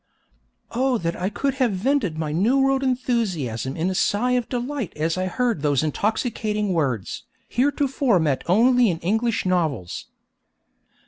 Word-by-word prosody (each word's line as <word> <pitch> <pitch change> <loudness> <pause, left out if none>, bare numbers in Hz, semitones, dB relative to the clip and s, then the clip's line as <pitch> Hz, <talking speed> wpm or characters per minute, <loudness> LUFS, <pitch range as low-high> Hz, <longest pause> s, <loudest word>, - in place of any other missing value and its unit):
Oh 255 +1 +1
that 170 -4 -2
I 185 +2 -2
could 275 +6 -1
have 240 -5 +3
vented 200 - 0
my 155 -2 -2
New 205 - +2
World 270 0 +2
enthusiasm 200 - -1
in 165 +2 0
a 190 - 0
sigh 210 +6 +1
of 245 -2 0
delight 250 - -3
as 160 +2 0
I 185 0 -1
heard 235 - -1
those 145 -1 +2
intoxicating 210 - -1
words, 130 - -2 0.2
heretofore 270 -4 +1
met 150 -5 +1
only 240 +4 +5
in 170 - -1
English 220 +5 0
novels! 160 - -1
210 Hz, 145 wpm, -23 LUFS, 165-250 Hz, 0.2 s, only